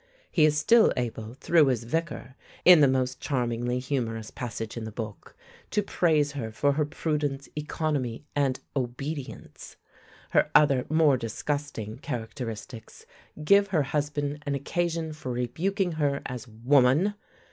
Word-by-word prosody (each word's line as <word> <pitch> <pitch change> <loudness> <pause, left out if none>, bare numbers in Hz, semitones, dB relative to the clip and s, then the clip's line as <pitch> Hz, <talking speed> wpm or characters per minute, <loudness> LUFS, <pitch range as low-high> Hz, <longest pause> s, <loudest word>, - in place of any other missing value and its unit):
He 155 -4 +4
is 150 -1 +3
still 220 +10 +5
able, 115 -1 -4
through 155 +2 +4
his 125 -3 0
Vicar, 140 0 -3 0.3
in 180 -2 +9
the 145 - +6
most 130 -1 0
charmingly 120 -2 -1
humorous 120 -5 -3
passage 115 -3 -5
in 115 - -5
the 110 - -6
book, 110 -1 -8 0.3
to 210 - 0
praise 155 -7 +2
her 125 -6 -5
for 140 +6 +1
her 150 +1 +1
"prudence, 145 -3 -2
economy, 150 -5 -2
and 135 -3 +1 0.2
obedience." 135 +3 -5 0.6
Her - - +3
other, 140 -4 +5
more 155 -3 +4
disgusting, 115 -1 -4
characteristics 115 -1 -7 0.4
give 200 +5 +5
her 170 -7 +1
husband 145 0 -2
an 140 - 0
occasion 165 +2 -2
for 140 -4 -6
rebuking 175 - -1
her 145 -3 -1
as 125 -1 -6
"Woman!" 130 - +3
140 Hz, 135 wpm, -27 LUFS, 120-150 Hz, 0.6 s, in